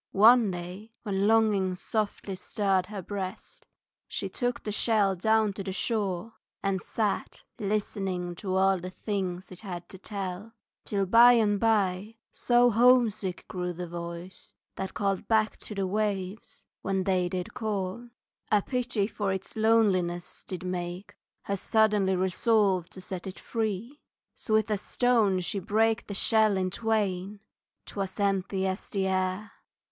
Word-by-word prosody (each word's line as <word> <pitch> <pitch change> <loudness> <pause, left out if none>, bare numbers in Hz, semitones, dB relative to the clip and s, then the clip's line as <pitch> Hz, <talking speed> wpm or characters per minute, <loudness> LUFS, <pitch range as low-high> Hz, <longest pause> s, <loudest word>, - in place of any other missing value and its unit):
One 225 +1 +7
day, 185 +5 -7
when 200 -2 0
longings 205 -5 +3
softly 210 -2 -2
stirred 190 -1 0
her 200 -2 -6
breast, 190 0 -6 0.4
She - - -3
took 245 -2 -2
the 210 - -3
shell 205 -2 +2
down 220 +2 +2
to 195 - -6
the 190 - -4
shore 200 0 -2 0.3
and 195 -2 0
sat 215 -3 -2 0.2
Listening 195 -4 -2
to 190 -1 -3
all 190 0 +3
the 180 +1 -6
things 185 -2 -4
it 185 - -9
had 175 -4 -6
to 190 - -10
tell, 200 +2 -5 0.3
Till, 200 -2 0
by 235 +5 +8
and 210 -3 +3
by, 210 -1 +1 0.2
so 245 0 +3
homesick 230 -5 +3
grew 180 -1 -3
the 180 +1 -5
voice 170 +1 -8 0.2
That 190 - -5
called 195 -3 -1
back 220 -1 +2
to 210 - -8
the 195 -1 0
waves 200 0 -3 0.2
when 195 -1 0
they 185 -2 +1
did 180 0 -4
call, 215 +1 -3 0.4
A 210 -2 +4
pity 250 -5 0
for 205 -2 -2
its 190 0 -5
loneliness 195 -6 +1
did 185 -1 -6
make 180 +1 -4 0.3
Her 200 - -1
suddenly 210 -2 +2
resolve 190 -1 +2
to 185 - -10
set 185 0 -6
it 190 - -7
free, 225 +4 -3 0.3
So 215 - -1
with 220 0 +2
a 210 - +2
stone 215 -4 +2
she 195 +3 -2
brake 220 +4 +1
the 200 - -5
shell 215 -1 +4
in 185 -1 0
twain, 205 -2 -1 0.4
_'Twas 195 -1 -5
empty 195 -1 0
as 190 +1 -3
the 195 -2 0
air. 185 +3 -1
195 Hz, 150 wpm, -28 LUFS, 185-220 Hz, 0.4 s, by